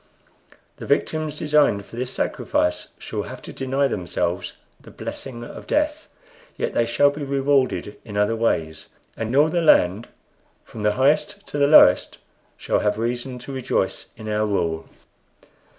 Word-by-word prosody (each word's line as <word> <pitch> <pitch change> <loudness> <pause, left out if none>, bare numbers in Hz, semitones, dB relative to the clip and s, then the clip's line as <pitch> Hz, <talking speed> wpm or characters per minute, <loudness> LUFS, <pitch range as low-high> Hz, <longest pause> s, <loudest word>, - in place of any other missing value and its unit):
The - - -8
victims 155 -1 0
designed 150 -10 +2
for - - -13
this 125 +1 -3
sacrifice 90 -7 -1
shall - - -4
have - - -8
to - - -9
deny 135 +1 0
themselves 90 -9 -2 0.3
the - - -15
blessing 120 -3 -7
of - - -10
death, 300 +1 0 0.5
yet - - -2
they 115 - +1
shall 145 +5 +4
be 145 +1 -8
rewarded 135 -5 0
in 105 -3 -7
other 105 +2 +2
ways; 80 -9 -1 0.3
and 115 +3 -3
all 150 +3 +5
the 175 +1 0
land 105 - +4 0.6
from 110 - -10
the 105 0 +2
highest 155 - +1
to 145 - -3
the 140 - +4
lowest 155 - +6 0.4
shall - - 0
have 105 0 0
reason 120 +3 -3
to 125 +3 -8
rejoice 130 -2 -1
in 110 - -9
our 105 0 0
rule. 85 -5 -1
125 Hz, 155 wpm, -23 LUFS, 105-145 Hz, 0.6 s, lowest